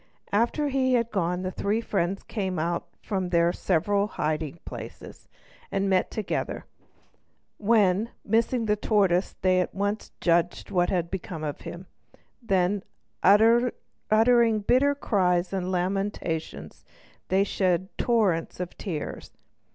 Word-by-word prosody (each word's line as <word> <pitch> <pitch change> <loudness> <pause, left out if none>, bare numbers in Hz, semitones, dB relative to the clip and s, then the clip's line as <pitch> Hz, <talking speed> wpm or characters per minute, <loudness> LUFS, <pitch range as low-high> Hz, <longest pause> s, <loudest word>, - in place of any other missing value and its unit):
After 240 +8 +1
he 260 -1 +1
had 235 -1 0
gone 180 -1 -1
the 185 - -2
three 205 +4 -1
friends 195 -4 -1
came 190 -5 -3
out 170 +2 -1 0.2
from 190 -4 -2
their 170 0 +3
several 200 +3 +1
hiding 155 -4 -2
places, - - -9 0.4
and 195 0 0
met 185 -1 +2
together, 215 -3 -3 0.9
when, 210 -1 +3 0.2
missing 230 +2 +1
the 210 -1 +2
tortoise, 200 -4 +1
they 185 -1 +4
at 180 - -4
once 205 +2 -2
judged 170 +2 +1
what 175 -2 +2
had 170 -2 -1
become 175 -4 -5
of 150 -2 -4
him. 175 +2 -8 0.6
Then, 195 -2 +1 0.4
uttering 225 +1 +3
bitter 265 +7 +3
cries 185 -8 +1
and 185 -1 -2
lamentations, 185 -3 -3 0.4
they 190 +1 +3
shed 185 -1 0
torrents 205 -11 +1
of 180 -1 -5
tears. 165 -8 -6
195 Hz, 125 wpm, -26 LUFS, 175-215 Hz, 0.9 s, they